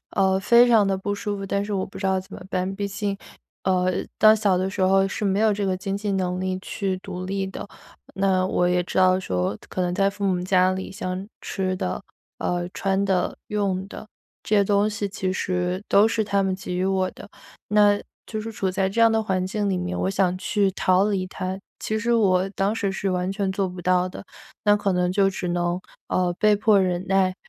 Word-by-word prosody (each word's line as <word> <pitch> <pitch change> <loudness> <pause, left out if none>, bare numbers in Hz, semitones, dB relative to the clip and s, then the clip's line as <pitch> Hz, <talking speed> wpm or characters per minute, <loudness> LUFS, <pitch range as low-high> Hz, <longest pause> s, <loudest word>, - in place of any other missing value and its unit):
呃， 190 -1 +2
非 235 +4 +6
常 220 -4 +5
得 195 -1 +1
不 205 +1 -2
舒 205 0 -3
服， 195 - -5
但 200 +1 -1
是 210 - -5
我 190 -2 0
不 - - -11
知 195 - -2
道 190 0 +2
怎 185 - -9
么 - - -9
办。 185 +1 -1
毕 200 -1 -2
竟， 200 0 -3 0.5
呃， 185 -1 +2 0.3
到 215 0 +7
小 205 -4 +2
的 185 +1 0
时 - - -5
候 195 +1 +4
是 200 +2 -4
没 195 0 +1
有 220 -1 +4
这 205 0 -2
个 185 -1 0
经 195 +1 -3
济 200 0 -2
能 180 -1 -1
力 185 0 -2
去 195 -1 -3
独 185 -1 -7
立 195 0 -2
的， 190 - -7 0.5
那 190 -1 +2
我 180 -1 +1
也 180 0 +2
知 180 - -3
道 185 0 +4
说 90 - -1
可 - - -4
能 175 0 -1
在 195 +1 +3
父 200 0 -5
母 185 -2 +1
家 185 0 +3
里， 190 0 -5
像 190 -1 -4
吃 185 -1 -2
的， 90 - -3 0.4
呃， 175 0 -1
穿 195 0 0
的、 190 -2 0
用 195 -2 -1
的， - - -9 0.4
这 215 - +1
些 200 - +4
东 205 +1 +2
西 210 -1 -3
其 190 -1 -2
实 180 0 -1
都 205 +2 +5
是 225 -1 0
他 200 -1 +1
们 190 -1 0
给 185 -1 -6
予 180 +1 0
我 190 -1 +1
的。 - - -12 0.4
那 205 0 +4 0.3
就 215 - -4
是 225 +1 -5
处 195 -3 -1
在 190 0 0
这 225 +4 -1
样 230 0 +7
的 220 0 +2
环 185 -3 -1
境 205 +1 -1
里 190 - 0
面， 180 +1 -3
我 - - 0
想 185 -2 +1
去 205 -1 +1
逃 185 +1 +2
离 190 -3 -1
它， 185 0 -4 0.2
其 220 0 -1
实 235 +2 0
我 190 -4 +3
当 195 +1 0
时 200 -3 -1
是 195 0 -2
完 180 0 -1
全 195 -1 -1
做 190 0 -1
不 180 0 -8
到 180 0 +2
的。 185 - -9 0.4
那 205 0 +5
可 200 -1 0
能 180 0 +1
就 195 +1 +3
只 185 -2 -4
能， 175 0 0 0.3
呃， 180 -1 +1
被 210 0 +4
迫 205 -1 +4
忍 180 -1 0
耐， 190 -1 +2
190 Hz, 245 characters per minute, -24 LUFS, 185-200 Hz, 0.5 s, 到